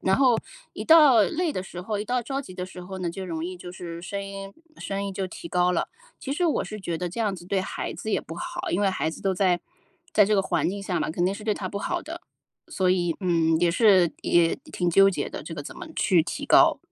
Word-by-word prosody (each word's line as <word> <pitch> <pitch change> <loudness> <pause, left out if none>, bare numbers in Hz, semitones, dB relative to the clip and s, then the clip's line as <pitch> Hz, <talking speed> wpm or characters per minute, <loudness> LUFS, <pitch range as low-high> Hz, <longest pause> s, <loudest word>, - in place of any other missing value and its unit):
然 190 - +2
后 - - -1 0.5
一 - - -6
到 295 -9 +7
累 330 - 0
的 185 - -2
时 180 -2 -8
候， 205 +3 -3
一 210 - -3
到 250 +3 0
着 270 +3 -3
急 255 - -10
的 180 - -4
时 185 0 -10
候 190 +1 -7
呢， 175 -2 -2
就 190 +2 -6
容 165 -2 -4
易 180 +1 -5
就 175 0 -9
是 170 -2 -7
声 200 +3 -4
音 195 0 -8 0.3
声 195 0 -3
音 195 - -4
就 190 0 -2
提 170 -1 -9
高 180 0 +2
了。 170 - -1 0.3
其 275 - -4
实 355 +5 0
我 310 - +1
是 215 -1 -7
觉 170 -3 -3
得 180 - -2
这 185 +7 -5
样 210 -3 0
子 175 - -10
对 190 +1 0
孩 - - -4
子 - - -6
也 - - +2
不 - - -9
好， 350 0 -4
因 180 - 0
为 200 - +3
孩 185 -4 -1
子 - - -10
都 190 -1 0
在 180 -2 +2 0.5
在 210 - +6
这 210 +1 +2
个 - - +4
环 190 - 0
境 200 +1 -5
下 185 -3 -2
嘛， - - -1
肯 175 +2 -1
定 195 - 0
是 210 - -9
对 215 0 +1
他 195 -2 -4
不 200 - -4
好 345 +12 -2
的。 335 +3 -8 0.5
所 185 -1 +1
以， 175 -3 +1
嗯， 165 -3 +2
也 175 0 +3
是 185 -3 +5
也 170 -1 +3
挺 175 - -2
纠 195 +3 +6
结 - - -3
的， - - -7
这 - - -8
个 - - -6
怎 360 - -9
么 355 -1 -8
去 180 -6 +4
提 - - -5
高。 - - +6
190 Hz, 290 characters per minute, -25 LUFS, 175-210 Hz, 0.5 s, 到